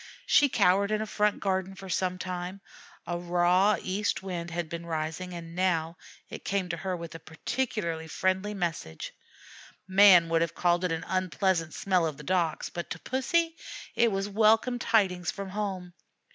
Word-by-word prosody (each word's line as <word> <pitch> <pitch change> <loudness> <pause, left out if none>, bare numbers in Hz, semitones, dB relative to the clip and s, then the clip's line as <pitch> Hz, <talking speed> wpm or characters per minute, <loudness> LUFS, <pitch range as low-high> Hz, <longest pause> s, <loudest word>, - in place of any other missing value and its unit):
She 285 -1 +5
cowered 200 -2 +3
in 215 0 0
a 215 - -2
front 210 -1 +1
garden 190 -1 -1
for 195 0 -10
some 185 0 -1
time. 180 +1 -5 0.5
A 175 0 -3
raw 180 +3 +3
east 195 +1 -2
wind 175 -3 -4
had 170 0 -3
been 170 +1 -6
rising, 160 +3 -3
and 165 -1 -8
now 170 -3 0 0.3
it - - -9
came 195 -2 -1
to 170 - -2
her 185 +1 -3
with 170 -1 -8
a 165 - -8
particularly 165 0 -3
friendly 190 +4 -1
message; 165 - -4 0.7
man 190 -3 +7
would 165 0 +2
have 165 -1 -1
called 175 0 +2
it 180 - 0
an 165 +1 -3
unpleasant 185 -2 0
smell 185 -4 +1
of 150 -3 -5
the 150 - -10
docks, 170 -1 0
but 175 -1 -6
to - - -4
Pussy 325 +6 0 0.4
it 235 -1 +3
was 195 0 -1
welcome 225 +4 +3
tidings 190 -7 +2
from 200 -1 -5
home. 190 -4 -4
185 Hz, 170 wpm, -28 LUFS, 170-200 Hz, 0.7 s, man